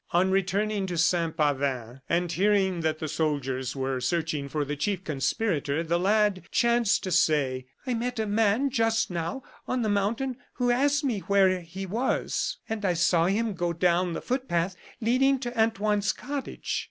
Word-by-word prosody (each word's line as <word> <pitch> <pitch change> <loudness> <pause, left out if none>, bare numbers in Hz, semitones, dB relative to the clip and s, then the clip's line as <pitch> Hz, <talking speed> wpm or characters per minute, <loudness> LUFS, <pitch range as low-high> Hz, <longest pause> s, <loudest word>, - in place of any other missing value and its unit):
On 185 +2 +3
returning 195 +1 0
to 175 -2 -3
Saint 165 -1 +1
Pavin, 135 -5 -1
and 175 0 +1
hearing 190 -1 +2
that 160 -1 0
the 155 - -4
soldiers 135 -5 -2
were 130 -1 -2
searching 155 -2 -1
for 150 0 -1
the 145 +1 -3
chief 190 +5 -2
conspirator, 155 - -1
the 170 +1 0
lad 205 0 +2
chanced 235 -3 +2
to 185 - -3
say: 135 -6 +2 0.2
"I 255 - -1
met 245 +1 -2
a 220 - 0
man 220 +5 +2
just 225 -4 +1
now 170 +9 -3 0.2
on 255 -2 0
the 215 - 0
mountain 230 +6 0 0.2
who 245 -1 +1
asked 285 +4 +2
me 245 -7 0
where 190 -1 +3
he 190 +3 -7
was; 230 +8 -1
and 220 -1 -4
I 185 -3 +2
saw 170 0 +3
him 215 +3 0
go 175 -2 -1
down 175 +1 +1
the - - -4
footpath 190 -9 -1 0.3
leading 260 +4 +3
to 240 -1 -4
Antoine's 210 -2 +1
cottage." 280 +1 -4
190 Hz, 170 wpm, -27 LUFS, 165-225 Hz, 0.3 s, On